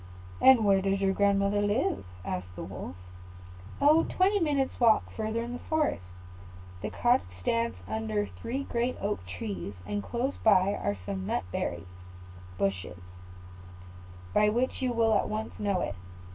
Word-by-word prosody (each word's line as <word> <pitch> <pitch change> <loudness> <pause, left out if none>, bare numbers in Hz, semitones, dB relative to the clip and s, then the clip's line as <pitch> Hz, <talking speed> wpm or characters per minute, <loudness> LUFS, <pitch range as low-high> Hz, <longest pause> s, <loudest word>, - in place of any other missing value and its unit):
"And 260 -5 +7
where 195 -1 +4
does 195 0 +1
your 195 -1 +2
grandmother 200 0 +2
live?" 205 - 0 0.2
asked 90 -1 -4
the - - -6
Wolf. 85 - -7 0.8
"Oh, 300 +3 +6
quite - - -7
twenty 395 +2 +4
minutes 290 -6 0
walk 230 -3 +4
further 220 +1 -2
in 240 +1 -5
the 245 - -5
forest. 315 - 0 0.8
The 105 - -3
cottage 240 - +2
stands 115 +3 0
under 110 -1 -1
three 165 - -5
great 245 -1 -1
oak 200 - -2
trees; 95 +1 -5
and 205 0 -2
close 250 +6 -2
by 200 -2 +5
are 100 - -2
some 95 -1 -4
nut - - 0 1.1
bushes, 95 -2 -2 1.4
by 210 0 +4
which 245 +5 0
you 255 -1 +1
will 230 -2 +3
at - - +2
once 215 +1 -4
know 200 -3 0
it." - - -2
205 Hz, 150 wpm, -29 LUFS, -, 1.4 s, And